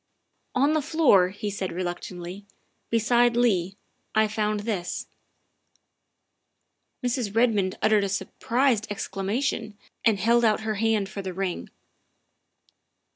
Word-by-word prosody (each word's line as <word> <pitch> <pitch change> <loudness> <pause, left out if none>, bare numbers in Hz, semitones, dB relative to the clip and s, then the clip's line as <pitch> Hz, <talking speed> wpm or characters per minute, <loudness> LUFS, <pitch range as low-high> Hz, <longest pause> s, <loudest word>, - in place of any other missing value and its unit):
" - - -43
On 295 +2 +4
the 310 - +2
floor," 285 - +4
he 205 +2 -5
said 195 -2 -3
reluctantly, 180 +2 -5 0.2
" - - -46
beside 240 +1 +3
Leigh, 195 -6 +2 0.4
I 220 0 +4
found 210 -1 -1
this." 205 -5 -3 2.0
Mrs. 240 -4 -1
Redmond 215 -5 +2
uttered 215 -1 +4
a - - -2
surprised 230 +4 0
exclamation 205 +2 -2 0.3
and 225 -3 +4
held 235 +4 +3
out 215 -2 +3
her 220 0 -1
hand 215 -1 +1
for 200 0 -6
the 185 -2 -6
ring. 190 -2 -3
210 Hz, 125 wpm, -26 LUFS, 195-235 Hz, 2.0 s, On